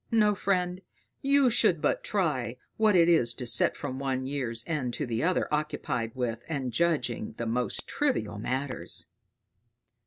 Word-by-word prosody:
No, 210 -2 +4
friend, 185 -2 0 0.4
you 275 -2 +4
should 215 -8 +4
but - - 0
try 140 - -1 0.2
what 215 -2 +3
it 170 -2 +6
is 125 -9 +4
to 125 - -4
sit 120 - +2
from 130 -2 -4
one 130 -1 -1
year's 125 -5 -2
end 135 -7 -2
to 145 - -2
the 115 -2 -2
other 180 +3 +1
occupied 125 -6 -2
with 120 -2 -2
and 135 -6 -2
judging 125 -7 0
the 115 - -3
most 120 +2 -1
trivial 275 - -1
matters." 130 +3 -3
140 Hz, 155 wpm, -28 LUFS, 120-180 Hz, 0.4 s, it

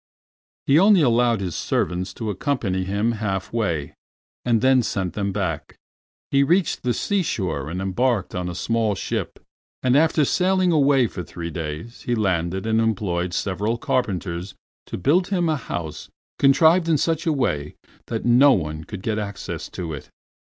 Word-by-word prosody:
He 140 +3 +5
only 195 -1 +6
allowed 120 -3 +3
his 90 -3 -3
servants 90 +1 -1
to 110 -2 -3
accompany 100 -5 -1
him 100 +4 0
half 105 -4 -3
way, 85 -10 -1 0.5
and 120 -2 +2
then 130 +2 +4
sent 95 -6 -2
them 100 0 -2
back. 95 -6 -3 0.6
He 140 - +4
reached 170 +5 +2
the 125 - 0
seashore 95 - -1
and 90 +3 -4
embarked 100 +2 0
on 90 -1 -3
a 90 - -6
small 110 +1 0
ship, - - -3 0.5
and 130 0 +3
after 155 0 +4
sailing 185 +3 +2
away 140 -4 +4
for 100 - -5
three 85 -1 -7
days 80 +8 -6
he 120 - -1
landed 95 -3 -1
and 110 0 +2
employed 90 -5 -1
several 105 +4 -1
carpenters 95 -7 -2 0.3
to - - -5
build 175 - +2
him 180 -4 0
a 155 - +2
house 85 - -6 0.3
contrived 160 +5 +5
in 160 - +4
such 165 +3 -1
a - - +4
way 75 - -1 0.3
that - - -3
no 130 +4 +6
one 80 -4 -3
could 100 -3 -8
get 110 -1 -1
access 100 -1 -5
to 85 -3 -5
it. 70 - -8
110 Hz, 165 wpm, -23 LUFS, 90-135 Hz, 0.6 s, only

